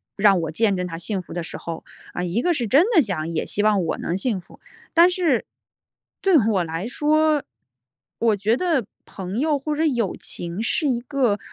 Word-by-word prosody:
让 200 -2 +4
我 165 - -3
见 205 +4 +2
证 180 - -2
她 165 -2 -6
幸 195 +2 -2
福 - - -11
的 175 - -3
时 165 - -6
候， 165 -1 -6 0.3
啊， 180 - -3
一 180 +6 -1
个 355 - +3
是 245 -8 -2
真 290 - +5
的 325 - +8
想 180 - -2
也 165 -1 -1
希 205 - -1
望 210 -4 +3
我 165 - -2
能 170 - -3
幸 200 +1 0
福。 175 - -17 0.3
但 340 +2 +7
是 340 -9 +1 0.8
对 380 -5 +5
我 210 -6 +2
来 165 +4 -4
说， 305 +2 +2 0.8
我 225 -2 +3
觉 210 +4 +1
得 320 - 0 0.2
朋 190 +3 -5
友 295 0 +2
或 300 +2 -3
者 315 - 0
友 240 - 0
情 175 +4 -5
是 295 +6 0
一 240 -2 0
个， 250 -5 0
220 Hz, 220 characters per minute, -23 LUFS, 180-295 Hz, 0.8 s, 的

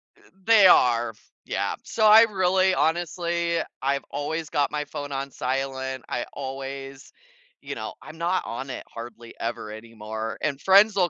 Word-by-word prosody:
Eh, - - -27 0.3
they 220 -4 +7
are 120 -7 +5
f 110 - -17
yeah - - -1
so 220 - 0
I 215 +1 +9
really 190 -3 +2
honestly 170 +1 0 0.2
I've 140 0 0
always 150 +2 -3
got 145 -1 +1
my 150 0 -2
phone 145 -2 -6
on 135 0 -4
silent, 130 0 -3
I 120 - -2
always 135 0 -7 0.5
you - - -6
know, - - -5
I'm 155 +1 -11
not 175 +3 0
on 130 +3 -5
it 130 - -6
hardly 115 0 -9
ever 115 -2 -4
anymore 110 0 -6
and 145 -2 -2
friends 200 +2 +6
will 180 -3 +3
140 Hz, 160 wpm, -25 LUFS, 130-175 Hz, 0.5 s, I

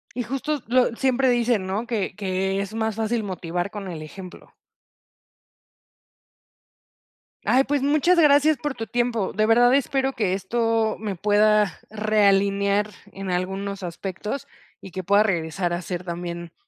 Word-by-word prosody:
Y 245 - -1
justo 275 +5 -2
lo 245 -1 +2
siempre 265 0 +1
dicen, 235 -4 +1
¿no? 205 +5 -3
Que 215 -7 -2
que 195 0 -1
es 200 +2 -6
más 220 -1 -1
fácil 225 0 -1
motivar 180 0 -3
con 205 -2 -6
el 160 -3 -6
ejemplo. 180 +3 -11 2.9
Ay, 265 +2 +4
pues, 285 -1 0
muchas 305 +5 +3
gracias 295 0 +5
por 290 +2 -3
tu 225 -3 -6
tiempo, 240 -4 -1
de 215 0 +2
verdad 240 +3 +5
espero 270 0 +1
que 200 -6 0
esto 225 +3 0
me 210 -3 -4
pueda 210 -1 +3
realinear 200 -1 +2 0.2
en 195 -1 -6
algunos 195 +2 -3
aspectos, 190 +8 -5 0.3
y 190 - -11
que 185 +1 -5
pueda 200 +4 +4
regresar 175 -2 -1
a 175 - -2
ser 180 +1 -5
también 170 0 -6
210 Hz, 145 wpm, -24 LUFS, 190-240 Hz, 2.9 s, gracias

